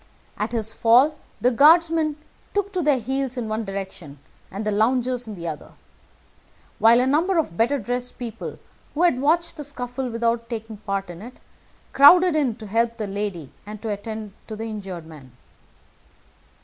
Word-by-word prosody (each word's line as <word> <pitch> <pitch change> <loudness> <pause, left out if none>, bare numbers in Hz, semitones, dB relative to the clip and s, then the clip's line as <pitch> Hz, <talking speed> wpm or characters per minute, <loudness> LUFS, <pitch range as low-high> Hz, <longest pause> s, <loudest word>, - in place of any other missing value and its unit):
At 210 +2 -3
his 225 -2 -2
fall 245 +8 +5 0.3
the 250 - +3
guardsmen 315 +3 +4 0.4
took 405 0 -1
to 365 - 0
their 295 -4 +3
heels 265 +2 -3
in 235 -3 -3
one 215 +1 -2
direction 190 -7 -7 0.3
and 200 +3 -6
the 210 - 0
loungers 245 +3 +1
in 215 - -6
the 170 -2 -6
other, 155 -2 -7 1.1
while 230 +2 +6
a 250 - +2
number 330 +8 +2
of 310 - 0
better 240 +9 +2
dressed 245 +1 -4
people 230 -3 -6 0.4
who 325 - +1
had 275 -8 +3
watched 335 +4 +1
the 295 - -5
scuffle 255 -2 -5
without 230 0 -1
taking 225 -2 -6
part 195 -2 -4
in 175 +1 -11
it 245 +4 -10 0.6
crowded 350 +5 +7
in 275 -7 +1
to 220 - -11
help 230 +3 0
the 215 - -3
lady 195 -7 -4
and 210 +1 -9
to 225 - -3
attend 210 0 -5
to 220 - -6
the 220 - -6
injured 195 -6 -6
man. 145 -6 -14
230 Hz, 175 wpm, -23 LUFS, 210-270 Hz, 1.1 s, crowded